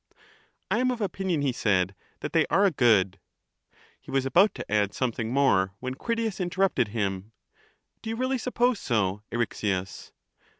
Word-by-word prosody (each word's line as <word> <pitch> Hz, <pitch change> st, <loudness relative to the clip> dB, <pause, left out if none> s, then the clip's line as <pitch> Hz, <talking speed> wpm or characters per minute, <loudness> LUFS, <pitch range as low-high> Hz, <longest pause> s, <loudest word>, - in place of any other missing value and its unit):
I -, -, +2 dB
am 255 Hz, 0 st, +2 dB
of 250 Hz, -2 st, -2 dB
opinion, 190 Hz, -6 st, -1 dB
he 140 Hz, -, +2 dB
said, 95 Hz, -6 st, +1 dB, 0.3 s
that -, -, -5 dB
they -, -, +3 dB
are 200 Hz, -, +3 dB
a 195 Hz, -, +4 dB
good. 105 Hz, -, +3 dB, 0.8 s
He -, -, -17 dB
was 135 Hz, -1 st, 0 dB
about 185 Hz, +9 st, +4 dB
to -, -, -6 dB
add 105 Hz, -1 st, +1 dB
something 115 Hz, -3 st, -2 dB
more, 100 Hz, -9 st, +2 dB
when 130 Hz, 0 st, -4 dB
Critias 225 Hz, -, -2 dB
interrupted 180 Hz, -, +1 dB
him: 100 Hz, -1 st, -3 dB, 0.3 s
— -, -, -42 dB
Do 220 Hz, -, -6 dB
you 225 Hz, -, -2 dB
really 255 Hz, +2 st, -1 dB
suppose 245 Hz, -1 st, +1 dB
so, 105 Hz, -4 st, 0 dB
Eryxias? 100 Hz, -5 st, -2 dB
130 Hz, 165 wpm, -27 LUFS, -, 0.8 s, a